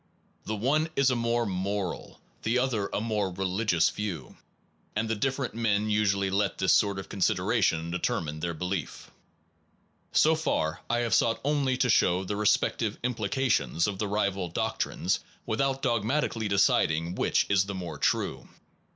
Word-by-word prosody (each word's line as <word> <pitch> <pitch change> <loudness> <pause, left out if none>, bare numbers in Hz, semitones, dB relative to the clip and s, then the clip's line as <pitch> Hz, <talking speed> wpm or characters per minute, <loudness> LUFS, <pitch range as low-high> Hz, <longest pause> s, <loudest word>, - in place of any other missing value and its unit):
The 110 - -2
one 145 +9 +1
is 135 -1 +3
a - - +1
more 120 0 0
moral, 95 0 -3 0.2
the 115 +3 +1
other 120 -6 0
a - - -1
more 105 -3 -1
religious 95 -1 +1
view; 95 -10 -5 0.6
and 110 0 -1
different 135 0 -1
men 110 -2 0
usually 100 -2 +1
let 100 +1 0
this 95 - +3
sort 100 -2 +3
of 95 - -6
consideration 85 -3 +1
deter 90 0 0
mine 75 -1 -6
their 85 0 -3
belief. 90 +2 -4 1.0
1 - - -38
So 160 - +5
far 90 - -1
I 120 0 +1
have 120 -1 -1
sought 115 -1 +3
only 140 -3 +1
to 130 -1 +1
show 90 -1 +3
the 100 +2 -3
respect 105 +3 +2
ive 110 -2 -1
implications 120 -6 0
of 100 -2 -3
the 105 - -1
rival 100 -3 -1
doctrines - - -1 0.3
without 135 +5 +1
Its 135 - -3
ad 135 - -24
dogmatically 115 0 0
deciding 85 -4 +2
which - - +1
is 95 -1 +3
the 100 - -5
vantages - - -4
more 85 - -6
true. - - -1
105 Hz, 170 wpm, -28 LUFS, 95-120 Hz, 1.0 s, So